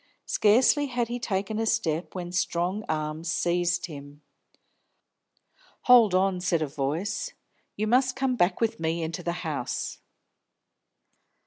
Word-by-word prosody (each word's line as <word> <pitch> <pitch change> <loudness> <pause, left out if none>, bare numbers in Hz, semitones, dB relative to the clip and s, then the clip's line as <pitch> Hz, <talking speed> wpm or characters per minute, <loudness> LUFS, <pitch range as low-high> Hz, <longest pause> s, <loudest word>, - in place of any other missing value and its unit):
Scarcely 250 +7 +4
had 240 -3 -2
he 245 +1 -3
taken 205 0 -2
a 225 - 0
step, 180 -8 -1
when 175 -1 -5
strong 180 +3 -1
arms 155 +1 -2
seized 175 0 0
him. 145 -2 -11 1.6
"Hold 235 -6 +6
on!" 185 -1 +2
said 170 -3 +1
a - - -2
voice. 160 - -3 0.4
"You 215 - 0
must 255 +3 +2
come 265 -2 0
back 180 -4 +1
with 230 -6 0
me 165 +1 -1
into 165 +2 -4
the 170 - -2
house." 145 -6 -3
180 Hz, 130 wpm, -27 LUFS, 160-225 Hz, 1.6 s, Hold